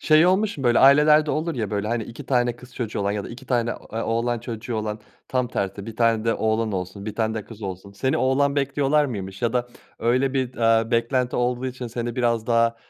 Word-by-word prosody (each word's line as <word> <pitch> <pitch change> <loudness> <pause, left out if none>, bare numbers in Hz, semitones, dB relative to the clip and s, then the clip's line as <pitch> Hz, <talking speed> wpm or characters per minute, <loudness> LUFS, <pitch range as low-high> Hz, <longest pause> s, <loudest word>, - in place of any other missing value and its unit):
Şey 155 +2 +5
olmuş 195 0 +2
mu? 135 - -5
Böyle, 120 -1 +4
ailelerde 150 +3 +6
olur 160 +2 -1
ya, 110 -5 -3
böyle, 105 0 -2
hani, 115 0 -1
2 115 - -10
tane 120 -2 +1
kız 125 0 -15
çocuğu 115 -4 -3
olan 100 0 0
ya 100 -1 -3
da - - -7
2 125 +2 -10
tane, 120 -2 +1 0.2
eee, 110 - -3
oğlan 115 +1 0
çocuğu 115 0 -5
olan 110 0 -3 0.3
tam 125 -1 0
tersi 100 -2 -3
1 115 -1 -8
tane 115 -2 +2
de 115 - +2
oğlan 110 0 0
olsun 95 +2 -5
1 110 - -4
tane 110 -1 0
de 110 -2 -4
kız 110 +1 -12
olsun. 95 0 -6
Seni 130 +6 0
oğlan 140 +2 +2
bekliyorlar 140 +1 +2
mıymış? 95 -6 -5
Ya 115 -1 +1
da, 125 -1 0 0.3
öyle, 130 +4 +1
bir, 130 -2 0
eee, 115 -1 +2
beklenti 120 +2 +1
olduğu 125 +1 0
için 125 -1 -5
seni 120 0 -4
biraz 115 -3 +1
daha, 115 -1 +2
120 Hz, 230 wpm, -23 LUFS, 110-130 Hz, 0.3 s, ailelerde